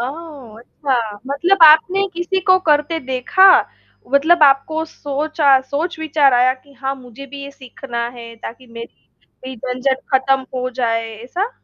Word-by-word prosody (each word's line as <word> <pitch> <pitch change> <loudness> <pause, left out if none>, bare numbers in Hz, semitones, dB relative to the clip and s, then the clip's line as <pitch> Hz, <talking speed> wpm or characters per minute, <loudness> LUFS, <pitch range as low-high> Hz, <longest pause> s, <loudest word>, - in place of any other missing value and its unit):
ओह! 270 -4 -8
अच्छा 265 +3 -4 0.3
मतलब 340 +6 +1
आपने 340 +6 +6
किसी 350 +2 -2
को 370 0 +3
करते 300 +2 +2
देखा। 265 +9 +3 0.6
मतलब 315 +4 +3
आपको 290 +3 +3
सोचा 290 -1 0
अ, - - +1
सोच-विचार 300 0 0
आया 250 +1 +3
कि 280 +2 -23
हाँ 270 0 -4
मुझे 255 +1 -12
भी 280 +1 -10
ये 280 - -8
सीखना 245 -3 -7
है 230 -1 -10
ताकि 240 +3 -10
मेरी 230 0 -13 0.4
भी - - -15
झंझट 255 +3 -2
खत्म 265 0 +2
हो 255 0 -2
जाए, 230 -1 -1
ऐसा? 375 - -3
275 Hz, 150 wpm, -18 LUFS, 255-315 Hz, 0.6 s, आपने